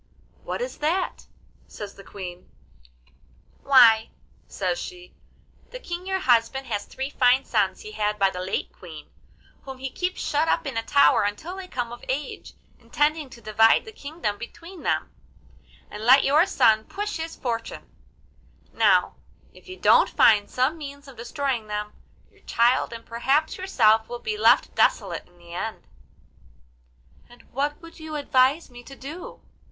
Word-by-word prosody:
'What - - -5
is - - -6
that?' 335 +5 -1 0.4
says 205 -2 -8
the 195 - -14
Queen. 180 -3 -9 1.1
'Why,' 235 -5 +6 0.4
says - - -2
she, 360 -1 -9 0.6
'the - - -8
King 360 -5 -7
your 380 0 0
husband 260 -4 +2
has 210 -4 -3
three 265 +2 -6
fine 255 0 +3
sons 200 -4 0
he 215 - -9
had 210 0 -1
by 195 -2 +3
the 180 - -6
late 185 +1 -3
Queen, 160 -4 -12 0.5
whom 265 -1 -9
he 265 0 -5
keeps 360 +5 -3
shut 300 +2 0
up - - +1
in 275 - -4
a 225 - 0
tower 280 +5 +4
until 210 - -3
they 380 -1 -8
come 245 -7 -4
of 240 - -10
age, 275 +3 -4 0.2
intending 300 -1 0
to 235 - -14
divide 225 - +4
the 440 - -9
kingdom 285 - -5
between 335 +9 -10
them, - - -1 0.8
and 210 - -8
let 260 +4 +7
your 305 +6 +4
son 220 - +3
push 415 0 -4
his 325 0 -5
fortune; 230 -3 -5 0.9
now, - - +3 0.4
if - - -18
you 370 - -8
don't - - +5
find 205 -2 +4
some 265 +6 0
means 285 -1 -9
of 270 - -12
destroying 240 -1 -3
them; 210 0 -4 0.4
your - - -26
child 240 +2 +2
and 230 0 -9
perhaps 270 +7 0
yourself 225 - +2
will 240 - -5
be 425 - -4
left 430 - +4
desolate - - +1
in 175 - -25
the 170 0 -14
end.' 215 +5 -5 1.4
'And 240 - -17
what 290 +3 -2
would 330 0 -13
you 315 -1 -7
advise 280 +1 +2
me 245 0 -11
to 275 - -11
do? 295 +7 -9
260 Hz, 160 wpm, -24 LUFS, 220-315 Hz, 1.4 s, let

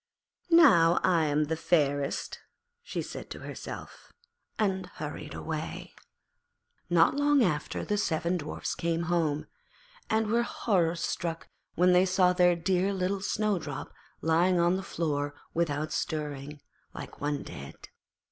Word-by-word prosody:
'Now 225 - +6
I 170 -4 +3
am 150 0 +2
the 155 +2 -1
fairest,' 145 -4 0 0.4
she 485 - -4
said - - -8
to - - -8
herself, - - -8 0.5
and 190 -3 0
hurried - - -6
away. - - -5 1.0
Not 170 -1 +5
long 290 -2 +4
after 155 -7 -1
the 210 0 0
seven 170 0 0
Dwarfs 155 -2 -4
came 170 0 -1
home, 155 -3 0 0.6
and 220 0 +2
were 230 +3 +2
horror 180 -8 +1
struck 165 0 -3 0.3
when 180 +1 +4
they 180 +1 +5
saw 185 -1 +4
their 180 -1 +4
dear 185 +3 +1
little 190 +1 -1
Snowdrop 190 -9 -2 0.3
lying 170 +3 +3
on 175 +1 +3
the 190 - -2
floor 145 -6 -2 0.2
without 155 -2 -1
stirring, 150 -1 -4 0.3
like - - -9
one 145 -1 -1
dead. 70 -1 -9
170 Hz, 130 wpm, -29 LUFS, 155-190 Hz, 1.0 s, Now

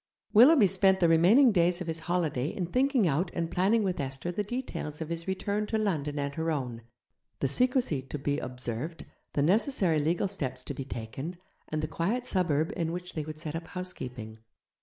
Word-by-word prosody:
Willoughby 250 +2 +8
spent 190 0 +4
the 170 - +4
remaining 190 - +6
days 175 -2 +2
of 180 - -4
his 165 0 -3
holiday 160 -6 -1
in 180 +3 -3
thinking 255 - +2
out 165 +4 +1
and 165 -1 -2
planning 205 +6 +2
with 185 -2 -1
Esther 135 +5 -3
the 205 +4 -2
details 205 - -5
of 160 -1 -5
his 170 +1 -4
return 205 +2 -1
to 220 - 0
London 155 -9 -1
and 140 0 -2
her 160 +2 -2
own, 125 -7 -3 0.6
the 135 - +1
secrecy 245 - +1
to 135 +3 -6
be 145 0 -1
observed, 125 +5 -5 0.3
the 140 - +1
necessary 190 - +3
legal 170 +6 +1
steps 130 -10 -4
to 140 - -5
be 135 -1 -6
taken, 135 +8 -6 0.3
and 155 0 -3
the - - 0
quiet 200 +11 -1
suburb 165 - 0
in 165 -1 -1
which 180 +1 -6
they 155 - -2
would 155 +1 -7
set 155 0 -5
up 165 0 -5
housekeeping. 125 -12 -6
165 Hz, 195 wpm, -29 LUFS, 145-195 Hz, 0.6 s, Willoughby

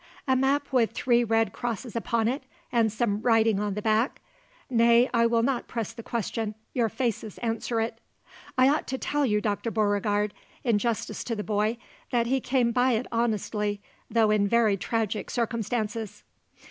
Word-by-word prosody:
"A 260 - +4
map 275 +2 +1
with 235 -3 +3
three 240 -1 +2
red 225 0 +1
crosses 240 0 -4
upon 230 -1 0
it 260 +5 -1 0.3
and 230 -3 +3
some 210 -1 -1
writing 225 -3 +3
on 205 -1 -2
the 210 - -4
back? 220 +4 +1 0.5
Nay, 235 0 +5
I 235 -1 +4
will 230 0 +2
not 260 -1 0
press 230 -4 -4
the 230 - -8
question. 225 -1 -3 0.2
Your 235 -3 +1
faces 225 -4 -3
answer 230 0 -2
it." 225 0 -2 0.6
"I 255 0 +6
ought 290 +3 +1
to 265 - -2
tell 290 +1 0
you, 210 -2 +1
Dr. 210 +2 -1
Beauregard, 205 -1 +1 0.3
in 230 -5 +2
justice 230 0 -2
to 230 - -2
the 210 - -3
boy, 215 +2 0 0.3
that 235 -1 +1
he 265 +2 +1
came 245 -2 +1
by 250 +1 +3
it 230 +2 0
honestly, 210 -3 -1 0.3
though 225 -2 +3
in 205 -1 +3
very 225 -1 +3
tragic 220 +2 -2
circumstances." 225 -2 -2
230 Hz, 170 wpm, -27 LUFS, 215-240 Hz, 0.6 s, I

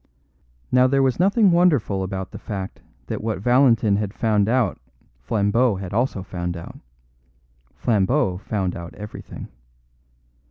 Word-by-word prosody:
Now 125 0 +5
there 135 +1 +2
was 130 +1 +1
nothing 200 +2 +4
wonderful 150 - +2
about 95 0 -4
the - - -8
fact 95 -3 -6 0.2
that - - -4
what 110 -1 -1
Valentin 115 -3 +3
had 105 -1 -3
found 105 -2 +1
out 120 -6 +1 0.4
Flambeau 105 - +1
had 95 -1 -6
also 115 -4 0
found 90 -2 -4
out; 85 - -10 1.0
Flambeau 105 -2 +1
found 95 -3 -2
out 85 0 -8
everything. 105 0 -9
105 Hz, 130 wpm, -22 LUFS, 95-125 Hz, 1.0 s, Now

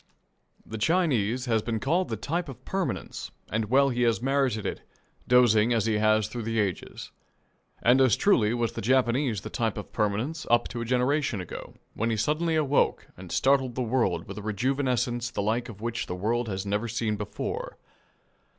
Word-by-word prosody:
The 110 - -6
Chinese 130 - +1
has 115 -3 +1
been 115 0 -2
called 170 +10 0
the - - -1
type 165 +1 -2
of 135 - -11
permanence, 190 -2 -3 0.2
and 110 0 0
well 135 +5 +4
he 125 -1 -1
has 115 -2 +3
merited 130 -4 0
it, - - -3 0.5
dozing 120 -2 +5
as 115 -2 +1
he 110 -2 +1
has 110 -1 +3
through 120 - -5
the 115 0 -1
ages. 100 -4 -3 0.7
And 125 +3 +5
as 130 -6 +5
truly 120 - +3
was 120 -1 0
the - - -6
Japanese 125 -1 +2
the - - -8
type 115 -3 -1
of 105 - -8
permanence 110 +9 -1
up 120 0 +3
to 120 - -5
a - - -3
generation 125 0 +1
ago, 90 - -8 0.2
when 115 +2 -1
he 115 - 0
suddenly 155 +8 +1
awoke 145 -2 +1
and - - -11
startled 130 -2 +2
the 130 - -1
world 110 -9 0
with 100 +2 -7
a - - -7
rejuvenescence 120 +2 -1
the 100 - -2
like 115 +4 -1
of 105 -2 -10
which 115 +1 -3
the 90 - -4
world 115 +5 -1
had 95 0 -3
never 105 +3 -1
seen 110 -1 -1
before. 105 0 -5
120 Hz, 185 wpm, -27 LUFS, 110-130 Hz, 0.7 s, dozing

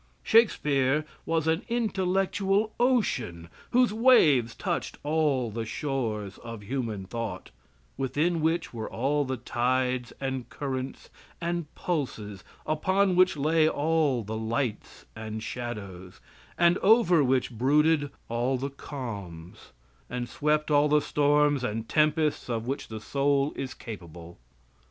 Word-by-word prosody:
Shakespeare 150 - +3 0.2
was 165 -1 +1
an 160 +2 +2
intellectual 195 -1 0
ocean 125 - 0 0.2
whose 245 -3 +3
waves 155 - +5
touched - - -3
all 145 -6 +1
the 115 +2 -3
shores 110 -5 -3
of 115 -3 -8
human 115 -4 -3
thought, 110 -2 -5 0.5
within 155 +5 0
which 165 -1 0
were 110 -2 -5
all 145 +4 0
the 130 0 -3
tides 125 +1 0
and 130 -2 -3
currents 130 -2 -5 0.3
and 170 -2 -2
pulses 110 - -3 0.2
upon 190 +5 +2
which 185 -2 +4
lay 155 +2 +3
all 150 -5 +1
the 110 +2 -5
lights 110 0 -3
and 110 0 -6
shadows, 105 -7 -6 0.4
and 175 +1 +4
over 190 -7 +5
which 130 -1 +1
brooded 145 +5 +2 0.2
all 120 +3 0
the 140 +2 -4
calms, 100 - -8 0.4
and 125 0 -3
swept 150 +2 0
all 145 0 +4
the 150 0 +5
storms 145 -2 +2
and 115 -1 -3
tempests 155 -2 +1
of 115 -1 -2
which 135 +3 -3
the 110 -1 -6
soul 140 +4 +1
is 130 -1 -5
capable. 85 - -10
135 Hz, 125 wpm, -27 LUFS, 115-160 Hz, 0.5 s, waves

